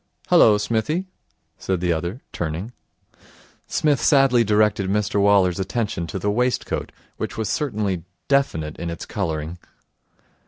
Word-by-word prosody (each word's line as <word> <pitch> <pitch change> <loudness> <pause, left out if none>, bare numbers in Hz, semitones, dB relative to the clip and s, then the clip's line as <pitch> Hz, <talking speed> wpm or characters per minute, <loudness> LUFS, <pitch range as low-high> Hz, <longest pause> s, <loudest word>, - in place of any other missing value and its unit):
'Hullo, 105 -1 +6
Smithy?' 115 - -1 0.5
said 95 -2 -1
the 90 -1 +1
other, 85 - -4
turning. 85 +8 -4 0.9
Psmith 150 -3 +1
sadly 135 -5 +5
directed 105 -2 +2
Mr 105 0 +1
Waller's 100 -3 +4
attention 95 -4 -2
to 75 - -4
the 105 - 0
waistcoat, 125 +3 -1 0.3
which - - -4
was 110 -1 -2
certainly 105 - -1 0.2
definite 80 - 0
in 85 - -3
its 85 - -6
colouring. 80 +1 -3
105 Hz, 125 wpm, -22 LUFS, 85-120 Hz, 0.9 s, Hullo